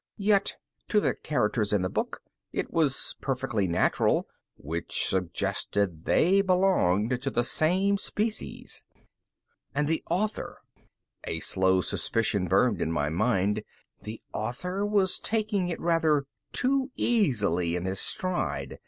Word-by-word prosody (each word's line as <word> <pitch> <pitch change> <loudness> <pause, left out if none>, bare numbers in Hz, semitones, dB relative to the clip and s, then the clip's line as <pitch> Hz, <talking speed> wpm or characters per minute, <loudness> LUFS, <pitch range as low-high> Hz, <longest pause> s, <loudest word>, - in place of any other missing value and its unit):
Yet, 200 -1 +2 0.3
to 210 - +3
the - - +1
characters 105 -7 -1
in 100 -3 +2
the - - +1
book, - - -3 0.3
it - - -3
was 150 -5 +1
perfectly 125 -7 -1
natural 85 - +1 0.3
which 80 +5 -1
suggested 90 -1 0
they 195 +4 +4
belonged 130 - +2
to 135 - -1
the 120 -2 0
same 190 +9 +2
species. 215 +2 -4 0.9
And 145 +1 +1
the 160 +1 0
author? 200 +5 -2 0.7
A 80 - -3
slow 95 +1 +2
suspicion 100 -1 0
burned 100 +2 +2
in 80 - 0
my 75 -3 0
mind. 105 +3 +1 0.4
The 110 +1 -7
author 180 - -3
was 205 -3 +1
taking 210 -4 0
it 170 - -3
rather 160 -4 +2 0.3
too 265 +1 +1
easily 105 - +1
in 90 0 -3
his 95 +1 -2
stride. 185 -1 -2
130 Hz, 125 wpm, -27 LUFS, -, 0.9 s, they